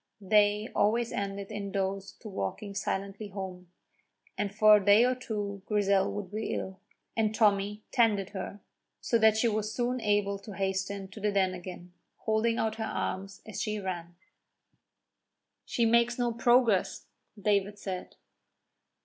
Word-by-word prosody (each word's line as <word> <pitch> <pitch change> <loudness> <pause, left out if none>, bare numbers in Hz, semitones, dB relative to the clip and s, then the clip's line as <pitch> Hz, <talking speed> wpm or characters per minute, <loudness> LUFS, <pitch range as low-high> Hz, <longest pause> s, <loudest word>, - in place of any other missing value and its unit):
They 210 +1 +3
always 230 +3 +2
ended 200 0 -4
in 200 -2 -4
those 195 0 -2
two - - -12
walking 200 - -4
silently 200 +1 -3
home, 185 -3 -7 0.6
and 205 -1 -2
for 215 +1 +7
a 205 - -2
day 205 +3 +7
or 255 - +3
two 205 -5 -4
Grizel 200 -2 +2
would 205 -3 -5
be 215 +1 -2
ill, 190 -1 -5 0.4
and 220 -1 +1
Tommy 210 -1 +2
tended 210 -6 +2
her, 200 +1 -6 0.4
so 230 - +1
that 220 -1 +5
she 235 - +3
was 215 -1 -1
soon 250 0 -1
able 205 -1 +1
to 200 0 -10
hasten 195 0 -2
to 215 - -10
the 210 0 0
Den 190 -2 +2
again, 180 0 -9 0.2
holding 225 +1 +1
out 220 0 -1
her 220 - -2
arms 195 -2 -4
as 215 - -5
she 215 -1 -1
ran. 175 -3 -5 1.5
"She 235 - +1
makes 235 +1 +3
no 240 -1 0
progress," 235 -3 +3 0.3
David 205 0 +1
said. 185 -3 -6
205 Hz, 150 wpm, -30 LUFS, 195-220 Hz, 1.5 s, for